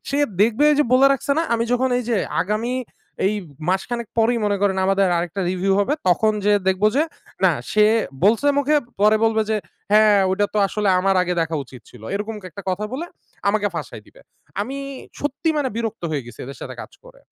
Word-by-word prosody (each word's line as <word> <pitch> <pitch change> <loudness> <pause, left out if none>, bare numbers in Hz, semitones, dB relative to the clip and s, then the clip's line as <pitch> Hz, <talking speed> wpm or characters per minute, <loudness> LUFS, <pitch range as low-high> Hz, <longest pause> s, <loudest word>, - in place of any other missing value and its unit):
সে 280 - 0 0.2
দেখবে 230 +6 +2
এইযে 295 0 +3
বলে 265 +2 +6
রাখছে 275 +1 -1
না? - - +2
আমি 230 0 0
যখন 255 +1 +2
এই - - -2
যে 235 - +1 0.3
আগামী 215 +6 -2 0.5
এই 205 - +1 0.3
মাসখানেক 230 +5 -1
পরেই 235 +2 +3
মনে 205 -1 +1
করেন 195 -1 +2
আমাদের 195 0 +3
আরেকটা 175 +3 -3
রিভিউ 185 +1 0
হবে। 205 - +1 0.2
তখন 215 +5 +3
যেয়ে 205 0 +3
দেখব 190 +2 +1
যে 295 - +4 0.4
না - - +6 0.2
সে 210 0 +5 0.4
বলছে 225 +7 +3
মুখে, 285 +2 +2 0.3
পরে 210 +1 +5
বলবে 220 -1 +2
যে 220 - +2 0.4
"হ্যাঁ 215 -1 +6
ওইটা 205 +2 +1
তো - - +2
আসলে 210 +1 -1
আমার 195 +1 +2
আগে 180 0 -1
দেখা 165 -1 -1
উচিত 125 -2 -13
ছিল"। 120 - -15
এরকম 210 +2 -3
একটা 185 +2 -9
কথা 190 +3 -2
বলে 315 +7 -4 0.4
আমাকে 205 0 +1
ফাঁসায় - - -6
দিবে। - - -19 0.4
আমি 255 +7 -4 0.4
সত্যি 290 +3 -2
মানে 280 -3 0
বিরক্ত 230 -5 -4
হয়ে 145 -5 -2
গেছি 120 -1 -12
এদের 135 +2 -9
সাথে - - -7
কাজ - - -13
করে। - - -17
210 Hz, 195 wpm, -21 LUFS, 190-245 Hz, 0.5 s, বলে